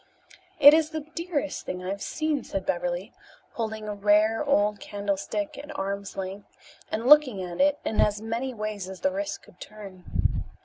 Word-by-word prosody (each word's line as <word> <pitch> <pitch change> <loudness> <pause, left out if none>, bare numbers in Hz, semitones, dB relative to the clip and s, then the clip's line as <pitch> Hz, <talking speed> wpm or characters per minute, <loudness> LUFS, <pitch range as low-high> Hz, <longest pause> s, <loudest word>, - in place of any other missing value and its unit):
"It 285 +1 +10
is 315 -1 +3
the 315 -2 -5
dearest 335 -4 -2
thing 180 0 -5
I 185 - -4
have 200 0 -5
seen," 310 -4 -1
said 195 - -4
Beverly, 175 +4 -2 0.4
holding 220 -2 -4
a 210 - -2
rare 210 +4 +3
old 210 -7 +2
candlestick 205 +10 -3
at 295 +1 -8
arm's 200 0 -4
length 195 +1 -5 0.4
and 225 +2 -2
looking 260 -8 +6
at 175 +4 -3
it 290 0 +4
in 220 - +1
as 210 0 +2
many 230 +4 -3
ways 215 -4 -4
as 190 - -9
the 285 - +2
wrist 300 +1 -4
could - - -19
turn. 195 -4 -4
215 Hz, 175 wpm, -27 LUFS, 200-285 Hz, 0.4 s, It